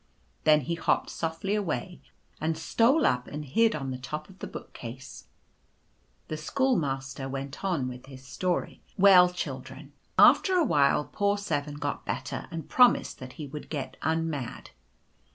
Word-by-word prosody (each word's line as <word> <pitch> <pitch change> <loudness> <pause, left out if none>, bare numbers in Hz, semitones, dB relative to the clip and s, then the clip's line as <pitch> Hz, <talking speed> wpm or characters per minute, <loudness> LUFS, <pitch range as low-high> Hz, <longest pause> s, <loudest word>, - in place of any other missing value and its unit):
Then 155 -1 +6
he 170 +5 -3
hopped 165 - 0
softly 165 +5 -2
away, 190 -2 -2 0.4
and 160 0 -1
stole 230 - +3
up 125 0 +1
and 150 +1 -6
hid 225 - +3
on 135 -3 -4
the 130 - -5
top 150 +5 -6
of 190 - -19
the - - -5
book - - -9
case. 130 +3 -9 1.0
The 155 - -4
Schoolmaster 140 - -1
went 135 +3 -6
on 170 -10 0
with 125 +1 -8
his 130 -1 -12
story. 180 +6 -2
" - - -34
Well, 180 -2 +8
children, 140 -4 -7 0.2
after 375 - +6
a 350 -3 +4
while 145 - +3
poor 205 0 0
7 145 -7 -2
got 145 -1 -3
better - - -4
and 165 -3 -6
promised 250 -1 +4
that 130 0 -9
he 155 - -7
would 145 +2 -8
get 145 -4 -4
unmad. 160 - -2
150 Hz, 160 wpm, -28 LUFS, 135-180 Hz, 1.0 s, Well